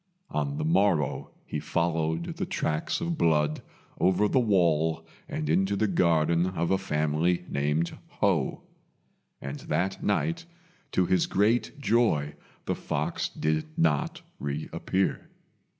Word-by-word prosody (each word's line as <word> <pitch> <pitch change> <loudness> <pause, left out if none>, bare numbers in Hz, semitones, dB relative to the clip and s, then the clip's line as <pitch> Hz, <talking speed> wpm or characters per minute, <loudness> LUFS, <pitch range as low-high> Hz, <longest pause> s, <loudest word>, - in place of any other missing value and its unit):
On 145 0 -1
the 155 - -1
morrow 100 - +2 0.2
he 75 - -3
followed 80 +1 0
the - - -1
tracks 75 - -1
of 170 -1 -2
blood 75 -2 +2 0.4
over 95 +3 +3
the 130 - +3
wall 80 -7 +2 0.2
and 75 - -3
into 95 +6 +2
the 110 - +1
garden 85 -1 +3
of 85 -2 -1
a 95 - +3
family 80 0 0
named 75 +4 0 0.2
Ho; - - +1 0.8
and 70 +1 -6
that 95 +1 -1
night, 165 +11 0 0.5
to 90 - +3
his 90 0 +2
great 115 +8 +1
joy, 110 - +2 0.3
the - - 0
fox - - -2
did 80 0 -1
not 75 -4 +1 0.2
reappear. 75 +6 -2
85 Hz, 125 wpm, -28 LUFS, 75-100 Hz, 0.8 s, over